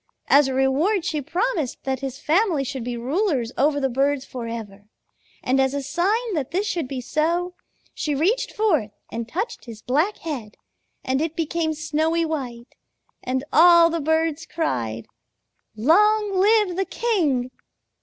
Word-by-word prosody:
As 280 0 +6
a 265 - -2
reward 300 +9 +2
she 305 -3 -1
promised 340 - -2
that 265 -1 -2
his 270 -1 -5
family 330 -1 +1
should 265 -2 -5
be 240 0 -4
rulers 265 - 0
over 285 +1 +2
the 270 - +1
birds 275 +2 0
forever, 230 -5 -7 0.6
and 265 +1 +1
as 265 +1 +1
a 280 - -2
sign 390 - 0
that 290 -6 -2
this 385 +4 -1
should 350 -8 -2
be 260 0 -4
so, 340 +7 -1 0.4
she 300 -2 -2
reached 375 - +1
forth 325 - +1 0.2
and 230 0 -5
touched 390 - -4
his 225 -3 -10
black 310 +11 +1
head, 255 -10 -6 0.5
and 265 +2 0
it 320 0 -2
became 320 -1 -1
snowy 315 +2 0
white, 255 -6 -5 0.5
and 260 +1 -2
all 340 0 +7
the 335 -1 -1
birds 320 +1 0
cried 115 - -2 0.7
'Long 410 - +3
live 405 -1 +3
the 385 - +1
king!' 315 - 0
305 Hz, 155 wpm, -23 LUFS, 260-350 Hz, 0.7 s, all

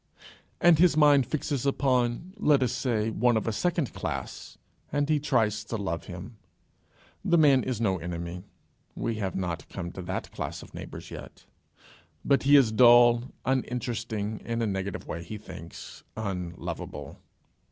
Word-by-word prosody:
and 175 -3 +6
his 170 -3 +5
mind 145 -4 +5
fixes 145 -3 -2
upon 135 +4 +1
let 150 -9 +4
us 120 - 0
say 115 -4 0
one 120 +1 +2
of 110 - -2
a - - +2
second 170 +3 -1
class, - - -5 0.3
and 145 0 +1
he 155 -1 +3
tries 110 -7 +1
to 115 +1 -4
love 90 -5 -3
him. 95 +6 -9 0.9
The 170 - +3
man 140 -5 +6
is 125 -4 -3
no 95 -5 +1
enemy 85 +1 -5 0.5
we 115 -1 -2
have 100 -3 -3
not 85 -3 -3
come 85 -3 -5
to 95 - -7
that 95 +1 -4
class - - -5
of - - -15
neighbours - - -8
yet - - -10 0.8
but 140 - +3
he 140 +1 +5
is 130 -6 +6
dull, 120 +1 +6 0.2
uninteresting 120 -4 -2
in 115 0 -2
a - - +2
negative 95 -2 -3
way, 85 - -5
he 105 +6 -7
thinks, 85 -5 -10
unlovable. 90 -5 -5
115 Hz, 155 wpm, -28 LUFS, 100-135 Hz, 0.9 s, and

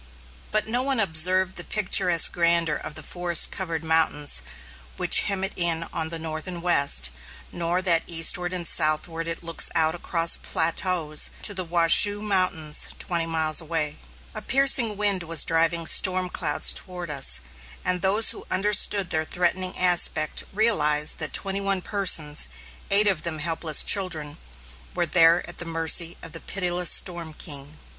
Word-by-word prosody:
But 215 0 -1
no 240 +3 +1
one 265 -2 +1
observed 185 0 +1
the - - -5
picturesque 180 -4 +2
grandeur 170 -2 -1
of - - -9
the 155 - -7
forest 175 0 +1
covered 165 -4 -5
mountains 160 - 0 0.6
which - - +4
hem 195 -1 -2
it 195 - -2
in 170 -1 -1
on 160 0 -2
the 165 - -6
north 155 0 -7
and 175 -2 -6
west; 140 - +2 0.4
nor 175 +1 -3
that 170 -3 +2
eastward 175 +2 +2
and 180 -2 -5
southward 165 +1 0
it 165 +1 -5
looks 165 -1 0
out 160 0 +1
across 170 -1 +1
plateaus 165 -2 +1
to 205 - +4
the 185 -1 -2
Washoe 175 +4 +4
Mountains 185 -7 0
twenty 170 -2 -3
miles 160 -1 +1
away. 160 -2 -4 0.3
A - - -8
piercing 265 -5 +2
wind 200 -3 0
was 165 -1 +1
driving 165 +1 0
storm 185 +2 +3
clouds - - -2
toward 180 -3 -3
us, 65 - +3 0.5
and 180 -1 -2
those 200 +4 +2
who - - -13
understood 200 -1 +2
their 155 -1 -1
threatening 180 +3 -2
aspect 175 -4 +1
realized 150 -9 +1
that - - -1
twenty 195 0 -2
one 195 -2 -1
persons, 165 -7 +1 0.4
eight 205 +1 +4
of 190 -6 -1
them 165 -1 -5
helpless 160 0 0
children, 160 -7 0 0.6
were - - -1
there 165 +1 +2
at 175 - -10
the 175 - -4
mercy 165 +1 0
of 165 - -10
the 165 - -9
pitiless 180 -2 -1
storm 170 -4 +1
king. 145 -2 -7
170 Hz, 160 wpm, -23 LUFS, 160-185 Hz, 0.6 s, which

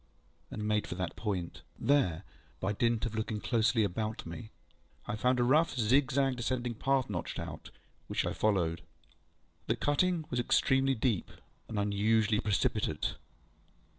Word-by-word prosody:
ŌĆØ - - -10
and 105 0 -3
made 105 -1 +1
for - - -4
that 90 -2 -3
point. 95 -6 -3 0.2
There, 115 - +2 0.4
by 95 +2 -1
dint 115 +1 +1
of 115 - -3
looking 110 -1 -2
closely 115 0 +2
about 110 +3 -2
me, 95 +7 -7 0.6
I - - -3
found 125 +3 +2
a - - +4
rough 145 +3 +3
zigzag 130 +3 +2
descending 120 0 -1
path 135 +3 +1
notched 90 -5 -4
out, - - -6 0.4
which - - -1
I - - -1
followed. 85 -6 +1 0.9
The - - +2
cutting 165 +3 +1
was 125 - 0
extremely 135 +2 +3
deep, 110 -5 0 0.4
and 110 - -4
unusually 105 +1 +2
precipitate. 105 -4 0
110 Hz, 145 wpm, -31 LUFS, 105-130 Hz, 0.9 s, a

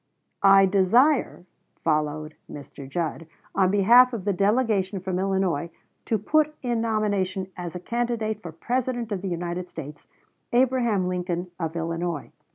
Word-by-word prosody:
"I 195 0 +7
desire," 200 - +3 0.4
followed 155 -1 -1 0.2
Mr. 140 -1 -10
Judd, 165 +1 -3 0.3
"on 190 -1 +3
behalf 235 +6 +6
of 210 -5 -4
the 205 - +1
delegation 200 -1 +1
from 185 0 -3
Illinois, 190 -4 0 0.4
to 220 - +1
put 305 +8 +1
in 240 -2 0
nomination 200 -4 -1
as 175 -1 -6
a - - -4
candidate 225 0 -2
for 170 - -7
President 240 +6 -2
of 195 -3 -2
the 195 - -4
United 175 +1 -4
States, 145 -2 -9 0.5
Abraham 240 -6 +2
Lincoln 180 -1 -3
of 165 -1 -3
Illinois." 165 -2 -3
190 Hz, 140 wpm, -25 LUFS, 175-225 Hz, 0.5 s, I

